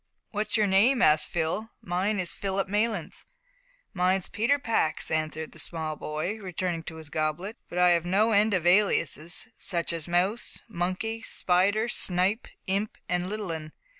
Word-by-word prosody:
"What's 215 Hz, +1 st, 0 dB
your 215 Hz, -, +3 dB
name?" 220 Hz, +7 st, +4 dB
asked 150 Hz, 0 st, +4 dB
Phil; 175 Hz, +7 st, -1 dB
"mine 190 Hz, +4 st, -1 dB
is 180 Hz, -2 st, 0 dB
Philip 195 Hz, 0 st, -2 dB
Maylands." 210 Hz, -3 st, -2 dB, 0.7 s
"Mine's 185 Hz, 0 st, +1 dB
Peter 235 Hz, +7 st, +2 dB
Pax," 230 Hz, -, 0 dB
answered 155 Hz, 0 st, -2 dB
the -, -, -10 dB
small 160 Hz, -2 st, -2 dB
boy, 155 Hz, +9 st, -4 dB
returning 180 Hz, -3 st, -3 dB
to 160 Hz, -, -7 dB
his 160 Hz, -2 st, -10 dB
goblet; 155 Hz, +7 st, -2 dB
"but 175 Hz, -, -6 dB
I've 175 Hz, -2 st, +4 dB
no 200 Hz, +6 st, +2 dB
end 210 Hz, 0 st, +4 dB
of 175 Hz, -2 st, -1 dB
aliases 175 Hz, -3 st, +3 dB
such 170 Hz, -2 st, +1 dB
as 165 Hz, -1 st, -4 dB
Mouse, 185 Hz, +6 st, 0 dB
Monkey, 220 Hz, +3 st, -3 dB
Spider, 200 Hz, +3 st, +2 dB
Snipe, 195 Hz, -1 st, 0 dB, 0.2 s
Imp, 200 Hz, +3 st, -1 dB
and 180 Hz, 0 st, -1 dB
Little 210 Hz, -3 st, -3 dB
'un. 155 Hz, -1 st, -5 dB
185 Hz, 155 wpm, -27 LUFS, 170-210 Hz, 0.7 s, name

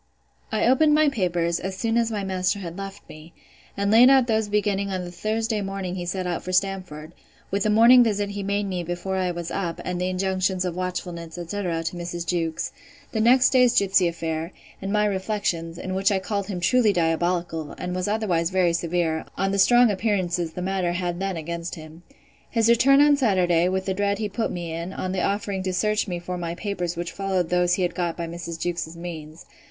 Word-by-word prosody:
I 215 Hz, -, +1 dB
opened 295 Hz, +5 st, +4 dB
my 305 Hz, -1 st, +4 dB
papers, 175 Hz, -8 st, 0 dB
as 190 Hz, 0 st, -5 dB
soon 230 Hz, -1 st, 0 dB
as 235 Hz, -1 st, +2 dB
my 205 Hz, -2 st, -2 dB
master 190 Hz, +1 st, 0 dB
had 170 Hz, -4 st, -7 dB
left 195 Hz, 0 st, -8 dB
me; 155 Hz, +2 st, -13 dB, 0.4 s
and 200 Hz, 0 st, +1 dB
laid 240 Hz, +4 st, +8 dB
out 265 Hz, -2 st, +5 dB
those 220 Hz, -3 st, 0 dB
beginning 205 Hz, -1 st, 0 dB
on 185 Hz, -2 st, -3 dB
the 175 Hz, -, -8 dB
Thursday 215 Hz, +4 st, -1 dB
morning 195 Hz, -2 st, -4 dB
he 175 Hz, -1 st, -5 dB
set 185 Hz, +1 st, -2 dB
out 175 Hz, -2 st, -2 dB
for 185 Hz, -, -6 dB
Stamford, 185 Hz, -5 st, -2 dB, 0.4 s
'with 200 Hz, +1 st, 0 dB
the 215 Hz, -, +1 dB
morning 235 Hz, +4 st, +7 dB
visit 205 Hz, -3 st, -1 dB
he 200 Hz, 0 st, -4 dB
made 200 Hz, +1 st, -1 dB
me 185 Hz, -2 st, -3 dB
before 175 Hz, +3 st, -3 dB
I 185 Hz, -1 st, 0 dB
was 175 Hz, -1 st, -5 dB
up, 175 Hz, -4 st, -3 dB
and 180 Hz, 0 st, -3 dB
the 180 Hz, -, 0 dB
injunctions 185 Hz, 0 st, 0 dB
of 175 Hz, -2 st, -3 dB
watchfulness, 180 Hz, -2 st, -5 dB
etc. 175 Hz, -1 st, -3 dB
to 165 Hz, -, -3 dB
Mrs. 175 Hz, -1 st, -5 dB
Jewkes; 165 Hz, -2 st, -2 dB, 0.4 s
the 220 Hz, -, -2 dB
next 250 Hz, +3 st, +5 dB
day's 250 Hz, -2 st, +4 dB
gipsy 190 Hz, -2 st, +4 dB
affair, 165 Hz, 0 st, -3 dB, 0.3 s
and 195 Hz, 0 st, -3 dB
my 210 Hz, 0 st, +2 dB
reflections, 190 Hz, -4 st, -2 dB
in 185 Hz, -, -5 dB
which 195 Hz, +2 st, +2 dB
I 195 Hz, -, +2 dB
called 200 Hz, +1 st, -3 dB
him 190 Hz, -4 st, -4 dB
truly 235 Hz, +3 st, +4 dB
diabolical, 170 Hz, -2 st, -1 dB
and 180 Hz, 0 st, -4 dB
was 185 Hz, +1 st, -2 dB
otherwise 195 Hz, -6 st, 0 dB
very 185 Hz, -2 st, +2 dB
severe, 170 Hz, -1 st, -1 dB
on 195 Hz, +1 st, 0 dB
the 200 Hz, -, 0 dB
strong 240 Hz, +2 st, +6 dB
appearances 185 Hz, -5 st, -1 dB
the 180 Hz, -, -5 dB
matter 185 Hz, -2 st, -1 dB
had 175 Hz, -1 st, -2 dB
then 195 Hz, -2 st, -2 dB
against 170 Hz, +2 st, -5 dB
him. 160 Hz, 0 st, -12 dB, 0.5 s
His 230 Hz, -1 st, +2 dB
return 275 Hz, +4 st, +6 dB
on 290 Hz, -1 st, +5 dB
Saturday, 180 Hz, -, +2 dB
with 190 Hz, 0 st, -1 dB
the 190 Hz, -, 0 dB
dread 200 Hz, +1 st, 0 dB
he 215 Hz, -1 st, -2 dB
put 220 Hz, +3 st, -2 dB
me 170 Hz, -2 st, -5 dB
in, 170 Hz, +3 st, -5 dB
on 185 Hz, -, -3 dB
the 185 Hz, -1 st, -1 dB
offering 200 Hz, -1 st, -1 dB
to 185 Hz, 0 st, -2 dB
search 215 Hz, +4 st, +1 dB
me 180 Hz, -2 st, -3 dB
for 180 Hz, +1 st, -5 dB
my 170 Hz, 0 st, -4 dB
papers 180 Hz, -3 st, -3 dB
which 170 Hz, 0 st, -3 dB
followed 190 Hz, -3 st, -1 dB
those 180 Hz, 0 st, +2 dB
he 185 Hz, -, -1 dB
had 175 Hz, -, 0 dB
got 175 Hz, -2 st, -2 dB
by 170 Hz, -, -3 dB
Mrs. 170 Hz, 0 st, -6 dB
Jewkes's 170 Hz, -1 st, -3 dB
means. 165 Hz, -2 st, -8 dB
185 Hz, 215 wpm, -24 LUFS, 175-205 Hz, 0.5 s, laid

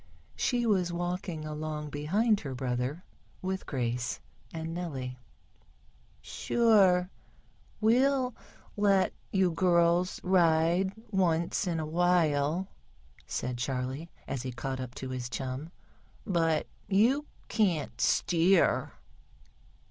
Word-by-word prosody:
She 245 Hz, -2 st, 0 dB
was 185 Hz, -5 st, +2 dB
walking 175 Hz, -2 st, -3 dB
along 150 Hz, -1 st, -4 dB
behind 200 Hz, +10 st, +1 dB
her 135 Hz, -3 st, -6 dB
brother, 125 Hz, +6 st, -2 dB, 0.4 s
with 190 Hz, 0 st, -3 dB
Grace 120 Hz, -, -2 dB, 0.3 s
and 165 Hz, 0 st, -5 dB
Nellie. 135 Hz, -8 st, -5 dB, 1.0 s
"Sure, 195 Hz, -6 st, +3 dB, 0.7 s
we'll 255 Hz, +3 st, +3 dB, 0.4 s
let 200 Hz, -2 st, +3 dB, 0.2 s
you 190 Hz, -2 st, +3 dB
girls 170 Hz, +1 st, +2 dB
ride 175 Hz, 0 st, +3 dB, 0.2 s
once 170 Hz, -2 st, +1 dB
in 170 Hz, -2 st, 0 dB
a 155 Hz, -, -2 dB
while," 165 Hz, 0 st, +2 dB, 0.6 s
said 125 Hz, -1 st, -3 dB
Charley, 130 Hz, +4 st, -3 dB, 0.2 s
as 135 Hz, -, -3 dB
he 130 Hz, 0 st, -4 dB
caught 130 Hz, +2 st, -4 dB
up 125 Hz, -1 st, -6 dB
to 130 Hz, -, -6 dB
his 125 Hz, -1 st, -4 dB
chum. 135 Hz, +5 st, -4 dB, 0.6 s
"But 165 Hz, -4 st, +1 dB, 0.2 s
you 245 Hz, +9 st, +3 dB, 0.2 s
can't 180 Hz, -9 st, 0 dB
steer." 175 Hz, +1 st, +3 dB
170 Hz, 100 wpm, -30 LUFS, 140-190 Hz, 1.0 s, Sure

